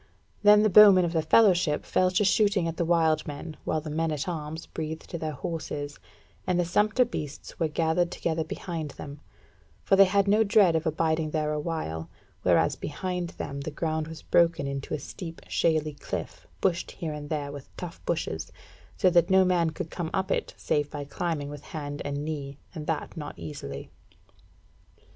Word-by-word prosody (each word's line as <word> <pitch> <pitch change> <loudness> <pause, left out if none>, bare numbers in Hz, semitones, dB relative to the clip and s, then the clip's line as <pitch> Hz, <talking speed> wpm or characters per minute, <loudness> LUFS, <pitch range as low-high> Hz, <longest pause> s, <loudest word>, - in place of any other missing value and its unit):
Then 210 0 +7
the 215 - +4
bowmen 195 -2 +9
of 170 - -2
the 160 - +2
fellowship 175 -3 +4
fell 185 - +2
to 195 +3 +2
shooting 200 -3 +3
at 165 -1 -4
the 170 - +1
wild 160 -2 +2
men, 155 +2 -6
while 155 - 0
the 155 0 -6
men 160 +1 0
at 150 +1 -3
arms 160 -1 -4
breathed 160 0 -6
their 155 -1 -3
horses, 145 -2 -5 0.5
and 180 -1 +2
the 175 - +2
sumpter 215 +8 +3
beasts 150 - -7
were 165 - +2
gathered 160 +2 +1
together 160 -1 -1
behind 160 -1 -5
them; 145 0 -8 0.6
for 195 - +4
they 195 0 +8
had 200 +1 +2
no 210 +2 +5
dread 200 -5 +5
of 160 +1 0
abiding 160 0 +1
there 150 -1 -1
a 150 - -1
while, 150 - -4 0.3
whereas - - +3
behind 180 +2 -3
them 140 0 -4
the 145 - -4
ground 155 0 -2
was 160 -1 -9
broken 165 -4 +3
into 140 +1 -3
a - - -5
steep 165 +1 -8
shaly 155 -2 +1
cliff, 145 - -6
bushed 175 -3 +1
here 160 -3 -5
and 145 -1 -7
there 145 -2 -2
with 145 -1 -9
tough 175 -2 -7
bushes, 155 - -2 0.5
so 185 - +4
that 170 0 +4
no 190 0 +6
man 175 -3 +2
could 160 +1 -6
come 170 -3 -3
up 190 0 -1
it - - -1
save 145 -1 0
by 145 -1 -5
climbing 155 -1 -2
with 145 - -8
hand 145 -2 -6
and 145 +1 -3
knee, 140 -3 -5 0.2
and 150 -2 -7
that 160 -2 -2
not 150 -2 -7
easily. 80 -3 -7
160 Hz, 185 wpm, -27 LUFS, 150-180 Hz, 0.6 s, bowmen